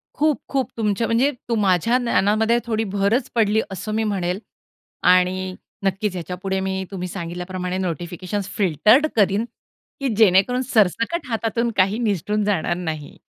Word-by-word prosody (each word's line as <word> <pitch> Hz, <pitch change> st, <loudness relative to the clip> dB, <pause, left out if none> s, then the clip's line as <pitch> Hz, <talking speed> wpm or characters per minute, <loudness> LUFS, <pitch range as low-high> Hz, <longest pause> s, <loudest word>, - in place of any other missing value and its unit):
खूप-खूप 285 Hz, -4 st, 0 dB
तुमच्या 220 Hz, 0 st, 0 dB
म्हणजे 245 Hz, +5 st, +2 dB, 0.2 s
तू 230 Hz, -, +2 dB
माझ्या 205 Hz, +3 st, +2 dB
ज्ञानामध्ये 225 Hz, -1 st, +2 dB
थोडी 225 Hz, -2 st, 0 dB
भरच 205 Hz, +5 st, 0 dB
पडली, 220 Hz, -1 st, +3 dB
असं 195 Hz, +3 st, -5 dB
मी 220 Hz, -, +1 dB
म्हणेल. 190 Hz, -3 st, -1 dB, 0.6 s
आणि 185 Hz, +1 st, +3 dB, 0.3 s
नक्कीच 195 Hz, +1 st, 0 dB
याच्यापुढे 180 Hz, +3 st, -3 dB
मी 190 Hz, 0 st, -2 dB
तुम्ही 185 Hz, -2 st, -4 dB
सांगितल्याप्रमाणे 180 Hz, +1 st, -4 dB
नोटिफिकेशन्स 180 Hz, +2 st, -3 dB
फिल्टर्ड 210 Hz, -, +4 dB
करीन, 205 Hz, +1 st, +2 dB, 0.5 s
की 275 Hz, -, -1 dB
जेणेकरून 220 Hz, +4 st, +4 dB
सरसकट 230 Hz, -, +1 dB
हातातून 230 Hz, 0 st, -1 dB
काही 195 Hz, +3 st, +3 dB
निसटून 210 Hz, -1 st, 0 dB
जाणार 190 Hz, -4 st, 0 dB
नाही. 160 Hz, -4 st, -5 dB
200 Hz, 130 wpm, -22 LUFS, 185-225 Hz, 0.6 s, फिल्टर्ड